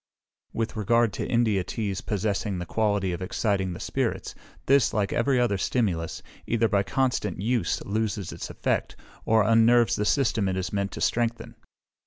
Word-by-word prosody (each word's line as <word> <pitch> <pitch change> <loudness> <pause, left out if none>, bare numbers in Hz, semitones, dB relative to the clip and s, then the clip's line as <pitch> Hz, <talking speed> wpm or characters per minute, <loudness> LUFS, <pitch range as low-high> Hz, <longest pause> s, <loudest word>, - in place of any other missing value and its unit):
With 115 -1 -3
regard 115 +1 +2
to - - -3
India 110 -6 +2
teas 100 -2 -3
possessing 105 -1 -2
the 90 - -4
quality 100 -1 0
of 85 - -5
exciting 95 -1 -1
the - - -8
spirits, - - -2 0.3
this, 135 -3 +3
like 100 -2 0
every 135 -3 +2
other 115 -6 +1
stimulus, 95 -9 -1 0.2
either 115 -1 +2
by 100 -1 +2
constant 105 -5 -1
use 115 +4 0
loses 105 -2 -2
its - - -7
effect, - - -2 0.3
or 110 -1 +4
unnerves 115 +1 +4
the 105 - 0
system 115 -6 +1
it 95 - -2
is 95 +1 -3
meant 100 -1 -1
to - - -6
strengthen. 120 0 -1
105 Hz, 165 wpm, -26 LUFS, 100-115 Hz, 0.3 s, or